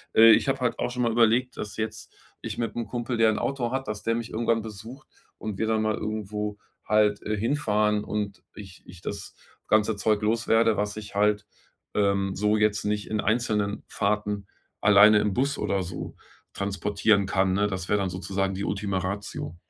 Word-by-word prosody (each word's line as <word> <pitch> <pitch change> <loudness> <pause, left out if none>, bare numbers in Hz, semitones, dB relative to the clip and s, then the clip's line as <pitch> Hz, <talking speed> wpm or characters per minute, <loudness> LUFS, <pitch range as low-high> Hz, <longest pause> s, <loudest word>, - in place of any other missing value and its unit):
Äh, 115 0 +9
ich 110 - +4
habe 135 0 +1
halt 125 -2 -1
auch - - 0
schon 125 0 -1
mal 120 - +2
überlegt, 120 +2 +2
dass 105 -1 -6
jetzt 110 0 -5 0.3
ich - - -5
mit 115 - -3
'nem 115 -2 -3
Kumpel, 120 +2 -3
der 115 -1 +5
'n 110 - 0
Auto 130 -4 -2
hat, 135 +1 -3
dass 105 -1 -4
der 115 - +1
mich 115 0 -4
irgendwann 115 0 +1
besucht 110 +7 -10 0.3
und 105 -3 -5
wir 110 - 0
dann 110 -1 +1
mal 110 -1 +1
irgendwo 105 -1 -4 0.3
halt, 105 -1 +3
äh, 105 0 -2
hinfahren 105 -3 +1
und 105 -2 -4
ich 95 -3 -11
ich 90 -1 -13
das - - -6 0.3
ganze 110 0 +3
Zeug 105 +1 +1
los 115 +2 0
werde, 115 -1 +4
was 105 +1 -2
ich 105 -2 -8
halt, 105 0 +2 0.5
ähm, 100 -1 +1
so 105 +2 +2
jetzt 105 -1 +1
nicht 105 0 -2
in 110 -1 0
einzelnen 105 -2 0
Fahrten 105 -1 -1 0.4
alleine 105 +1 +7
im 105 -1 0
Bus 140 +6 0
oder 100 -1 0
so 90 0 -7 0.4
transportieren 100 +1 +1
kann, 95 -1 +1
ne? 105 +2 +2
Das 95 -3 -4
wäre 105 - +3
dann 95 -1 -1
sozusagen 95 +2 -2
die 95 +1 -3
Ultima 100 -1 -2
Ratio. 95 -3 -5
105 Hz, 195 wpm, -26 LUFS, 100-115 Hz, 0.5 s, Äh